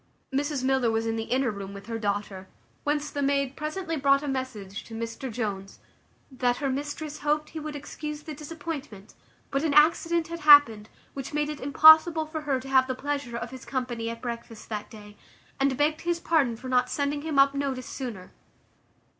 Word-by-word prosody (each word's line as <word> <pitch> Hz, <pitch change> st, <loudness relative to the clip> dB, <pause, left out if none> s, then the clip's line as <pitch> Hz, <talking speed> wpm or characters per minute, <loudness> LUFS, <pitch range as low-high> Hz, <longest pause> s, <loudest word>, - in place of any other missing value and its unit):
Mrs 285 Hz, -1 st, -1 dB
Miller 265 Hz, -2 st, +2 dB
was 225 Hz, 0 st, 0 dB
in 225 Hz, 0 st, -1 dB
the 225 Hz, 0 st, -3 dB
inner 255 Hz, -1 st, +1 dB
room 200 Hz, -1 st, -7 dB
with 200 Hz, -, -10 dB
her 230 Hz, 0 st, -4 dB
daughter, 200 Hz, -2 st, -3 dB, 0.4 s
whence 295 Hz, 0 st, -1 dB
the 285 Hz, -, -3 dB
maid 275 Hz, -1 st, +1 dB
presently 325 Hz, +3 st, -3 dB
brought 275 Hz, 0 st, +3 dB
a -, -, -4 dB
message 240 Hz, -7 st, -4 dB
to 225 Hz, -, -9 dB
Mr 230 Hz, +3 st, -5 dB
Jones, 200 Hz, -4 st, -4 dB, 0.5 s
"That 250 Hz, -2 st, 0 dB
her 275 Hz, -2 st, -1 dB
mistress 290 Hz, +2 st, -4 dB
hoped 300 Hz, +1 st, 0 dB
he 320 Hz, -, -5 dB
would 305 Hz, -1 st, -6 dB
excuse 300 Hz, +1 st, -6 dB
the 310 Hz, -, -7 dB
disappointment, 290 Hz, -8 st, -7 dB, 0.4 s
but 275 Hz, +2 st, 0 dB
an 300 Hz, -3 st, +1 dB
accident 330 Hz, +2 st, +4 dB
had 335 Hz, 0 st, -5 dB
happened, 290 Hz, -9 st, +7 dB, 0.2 s
which 275 Hz, +2 st, -6 dB
made 295 Hz, 0 st, 0 dB
it 300 Hz, -, -5 dB
impossible 315 Hz, +3 st, +7 dB
for 310 Hz, 0 st, -5 dB
her 280 Hz, -3 st, 0 dB
to 265 Hz, -, -10 dB
have 260 Hz, -1 st, +4 dB
the 260 Hz, -, -2 dB
pleasure 280 Hz, -3 st, -3 dB
of 235 Hz, 0 st, -5 dB
his 260 Hz, -1 st, -9 dB
company 245 Hz, -3 st, -3 dB
at 230 Hz, +1 st, -7 dB
breakfast 235 Hz, -2 st, -7 dB
that 210 Hz, -1 st, -5 dB
day; 210 Hz, -2 st, -13 dB, 0.4 s
and 270 Hz, -1 st, +1 dB
begged 305 Hz, +2 st, +1 dB
his 345 Hz, 0 st, -1 dB
pardon 295 Hz, -9 st, +2 dB
for 245 Hz, +3 st, -9 dB
not 250 Hz, 0 st, +2 dB
sending 285 Hz, 0 st, -1 dB
him 310 Hz, -2 st, -3 dB
up 275 Hz, 0 st, +6 dB
notice 275 Hz, -2 st, -2 dB
sooner." 220 Hz, -9 st, -7 dB
275 Hz, 195 wpm, -27 LUFS, 230-300 Hz, 0.5 s, happened